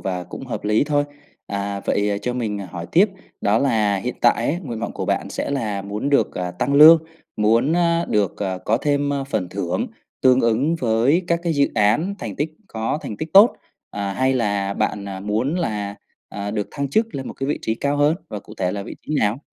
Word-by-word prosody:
và 90 -2 -3
cũng - - -9
hợp - - -5
lý 105 +5 +3
thôi. 145 -1 +1 0.4
À, 100 0 -3
vậy 100 0 +1
cho 125 - -1
mình 110 -4 -2
hỏi 90 -3 -7
tiếp 190 +6 +5 0.3
đó 105 +2 +2
là 110 -7 +2
hiện 120 +6 -3
tại 120 +1 +3
á 165 - -1
nguyện 120 -5 -5
vọng 115 - -3
của - - -4
bạn - - -1
sẽ - - -3
là 110 -8 -2
muốn 105 +6 -3
được, 140 -7 +2
à, 90 -1 -3
tăng 125 +10 -1
lương, 160 +2 +9 0.3
muốn, 115 +7 +3
à, 170 -1 +2
được, 100 -4 +1
à, 95 -2 -2
có 110 +4 +1
thêm, 145 +2 0
ơ, 140 -1 -1
phần 110 -9 -2
thưởng - - -2 0.4
tương 130 0 +5
ứng 120 +8 +2
với 125 +8 +2
các 170 -1 +1
cái 170 -1 0
dự 140 -1 +3
án 150 - +2
thành 110 - -6
tích 150 +2 -1 0.2
có 115 +3 -2
thành 105 - -6
tích 155 +7 -6
tốt, 205 +5 +7 0.3
à, 100 -1 -3
hay 130 +6 +1
là 100 -5 0
bạn, 100 0 -1
à, 95 -1 -6
muốn 110 - -1
là, 105 - -2 0.3
à, 100 0 -5
được 105 -1 -2
thăng 140 -2 -3
chức 220 +8 +1
lên 135 -2 -4
một - - -6
cái 135 - -4
vị 145 - -1
trí 110 - 0
cao 140 +5 -1
hơn 145 +3 +3
và 105 - -5
cụ - - -13
thể 90 -1 -1
là 100 - -4
vị - - -8
trí 155 - -2
nào? 105 +3 +1
115 Hz, 225 wpm, -21 LUFS, 100-145 Hz, 0.4 s, lương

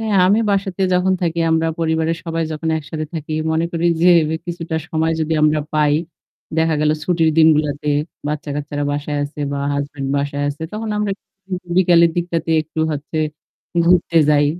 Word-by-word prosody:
হ্যাঁ, 220 -2 0
আমি 210 +4 +4
বাসাতে 195 -1 -1
যখন 180 +1 +2
থাকি 170 -1 -1
আমরা 160 0 +2
পরিবারের 160 0 0
সবাই 165 -1 -2
যখন 155 +1 -3
একসাথে 155 +1 -5
থাকি 155 -1 -5 0.2
মনে 160 +1 +1
করি 170 0 0 0.2
যে 180 - +6 0.4
কিছুটা 170 -2 -4
সময় 160 0 0
যদি 160 0 -1
আমরা 155 0 +3
পাই, 150 -1 +3 0.6
দেখা 160 0 +2
গেল 150 0 +3
ছুটির 165 -1 +2
দিনগুলাতে 150 -2 +3 0.4
বাচ্চা-কাচ্চারা 145 -1 -3
বাসায় 145 0 -2
আছে 145 +1 -8
বা 140 - -2
হাসব্যান্ড 140 -1 -3
বাসায় 145 0 -1
আছে 145 +2 -5
তখন 220 +1 -4
আমরা 210 -1 0 0.4
উ - - -7 0.2
বিকেলের 170 -2 +5
দিকটাতে 170 -1 -1
একটু 160 +1 -5
হচ্ছে 150 +2 -4 0.7
ঘুরতে 175 -1 +3
যাই। 145 -1 +4
160 Hz, 160 wpm, -19 LUFS, 150-170 Hz, 0.7 s, যে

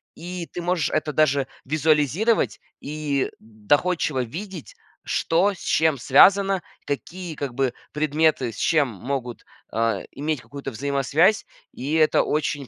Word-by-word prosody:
и 175 0 -6
ты 175 - -5
можешь 175 -2 0
это 155 -1 -1
даже 140 -2 +2 0.2
визуализировать 155 - +2 0.2
и 145 -2 -2
доходчиво 130 - 0
видеть, 175 - -8 0.3
что 180 +5 +1
с 185 - -14
чем 160 -2 +2
связано, 195 +9 +5 0.2
какие, 170 +4 -5
как 140 -3 -4
бы, 135 -2 0 0.2
предметы 150 -4 +1
с 110 - -12
чем 150 -5 +2
могут, 120 +3 -5 0.3
а, 115 -3 0
иметь 150 -2 -3
какую-то 140 -1 -7
взаимосвязь. 140 - +2 0.3
И 140 +4 -4
это 155 -1 +4
очень 145 -2 -1
150 Hz, 130 wpm, -23 LUFS, 135-165 Hz, 0.3 s, связано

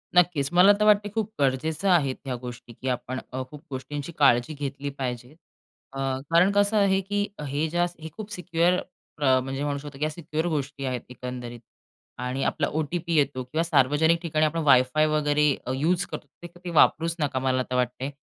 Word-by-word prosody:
नक्कीच. 165 -6 +3
मला 180 +3 +7
तर 210 - +3
वाटतंय 210 0 +4
खूप 220 -1 -2
गरजेचं 150 +7 0
आहेत 145 -8 +3
ह्या 130 -2 -2
गोष्टी, 120 -1 -9
की 130 - -8
आपण 130 +1 -3
अ, 130 - -2
खूप 150 -1 -12
गोष्टींची 145 +4 -5
काळजी 130 0 +4
घेतली 140 -1 -4
पाहिजे. 125 -1 -4 0.6
अ, 135 - -8 0.3
कारण 170 +4 +5
कसं 205 +1 +2
आहे 195 -2 +3
की 205 +1 -1 0.2
हे 145 +3 -1
ज्या, 175 +2 +1 0.2
हे 160 - -6
खूप 215 -1 -7
सिक्युअर 180 0 +1 0.4
अ, 130 -2 +5
म्हणजे 135 +2 -4
म्हणू 145 -1 -1
शकतो 140 -1 -10
की 150 - 0
या 155 - 0
सिक्युअर 155 0 -3
गोष्टी 145 -2 -3
आहेत 125 -1 -2
एकंदरीत 125 -1 -7 0.6
आणि 125 +2 -3
आपला - - 0
ओ-टी-पी 165 +2 -2
येतो 140 -3 +1
किंवा 155 +6 -1
सार्वजनिक 160 +2 +3
ठिकाणी 155 -2 +1
आपण 165 +2 -1
वायफाय 130 +2 +4
वगैरे 150 -1 +2
अ, 130 - -1
युज 170 +7 +1
करतो - - -7
ते, 175 - -13
ते 175 - -15
तुम्ही 175 0 -8
वापरूच 165 +2 +4
नका, 145 -3 0
मला 130 0 +1
तर 125 - -1
वाटतंय. 125 +2 -1
145 Hz, 190 wpm, -26 LUFS, 130-170 Hz, 0.6 s, मला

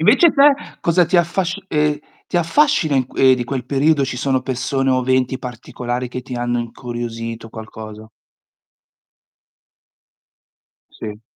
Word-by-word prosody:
Invece 265 - +5
te 285 0 +6 0.3
cosa 170 +1 +3
ti 185 - +2
affasc 180 +2 +1
ehm, 150 -2 +1 0.3
ti - - -2
affascina 175 - +3
in 130 -1 +1
ehm, 130 -1 +5
di 125 -1 -3
quel 125 0 -3
periodo 140 +2 +2
ci 130 - -4
sono 130 0 0
persone 135 +1 -1
o 130 0 +2
venti 130 0 +1
particolari 125 0 -5
che 125 +1 -6
ti 125 0 -7
hanno 120 0 -1
incuriosito, 115 -1 -5
qualcosa? 110 -1 -9 2.8
Sì. 105 -1 -8
130 Hz, 130 wpm, -19 LUFS, 120-155 Hz, 2.8 s, te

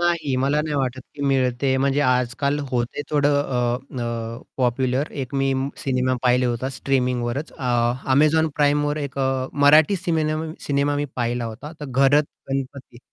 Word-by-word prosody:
नाही. 170 -5 +1
मला 145 +2 +2
नाही 150 -1 -3
वाटत 130 -2 -1
की 145 - -6
मिळते. 130 0 +1
म्हणजे 140 +1 +1
आज-काल 130 +2 +1
होते 120 +2 -2
थोडं 145 -1 +3
अ, 125 0 -2
अ, 115 0 -4 0.2
पॉप्युलर 130 +2 0
एक 130 +2 -8
मी 135 0 +1 0.2
सिनेमा 130 -1 0
पाहिले 125 0 +3
होता 120 +2 -2
स्ट्रीमिंगवरच 125 +1 -1
अ, 135 - -8 0.5
Amazon 155 +3 +4
Primeवर 145 0 +2
एक 140 -1 -6
अ, 130 -1 0
मराठी 150 +6 +5
सिमेन 160 -3 -1
सिनेमा 145 0 +1
मी 145 - -1
पाहिला 120 0 -1
होता, 120 +7 -7
तर - - -5
घरत 135 +2 +3 0.3
गणपती. 135 -2 -5
135 Hz, 150 wpm, -22 LUFS, 125-145 Hz, 0.5 s, मराठी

